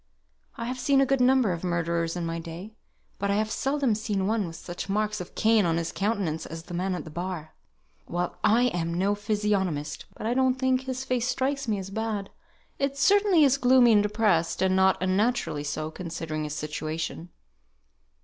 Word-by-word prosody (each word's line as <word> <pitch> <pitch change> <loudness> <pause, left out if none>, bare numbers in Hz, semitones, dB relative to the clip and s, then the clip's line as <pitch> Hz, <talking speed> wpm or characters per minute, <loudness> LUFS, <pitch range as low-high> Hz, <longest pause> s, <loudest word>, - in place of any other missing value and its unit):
I 230 - -5
have 255 +1 -4
seen 270 +2 +3
a 275 - +5
good 270 -1 +1
number 255 -4 +4
of 170 0 -4
murderers 170 -1 -1
in 175 -1 -3
my 165 0 -3
day, 170 +6 -8 0.5
but 200 - -1
I 200 - +2
have 215 +1 0
seldom 270 -2 +1
seen 210 -3 -1
one 215 -2 0
with 165 - -8
such 175 +3 -7
marks 210 0 0
of 180 - -10
Cain 220 -1 +4
on 165 -2 +1
his 170 -1 -2
countenance 195 -6 -1
as 165 +1 -7
the 175 +1 -10
man 185 +2 -1
at - - -5
the 155 - -10
bar." 170 -1 -5 0.5
"Well, 175 0 -2
I 230 +3 +4
am 170 -1 -2
no 195 +3 +2
physiognomist, 205 -7 -1
but - - -7
I 230 - +1
don't 260 0 +2
think 260 0 +1
his 260 0 -4
face 250 -2 0
strikes 270 +1 -1
me 215 -2 +1
as 195 0 -6
bad. 215 -2 -3 0.5
It 275 0 -1
certainly 395 0 +4
is 275 -1 +4
gloomy 250 -1 +6
and 210 -2 +6
depressed, 205 -6 +1
and 185 0 +3
not 190 0 +4
unnaturally 190 -5 0
so, 155 +1 -3
considering 160 -2 -4
his 150 0 -4
situation." 155 +2 -4
200 Hz, 195 wpm, -27 LUFS, 170-245 Hz, 0.5 s, gloomy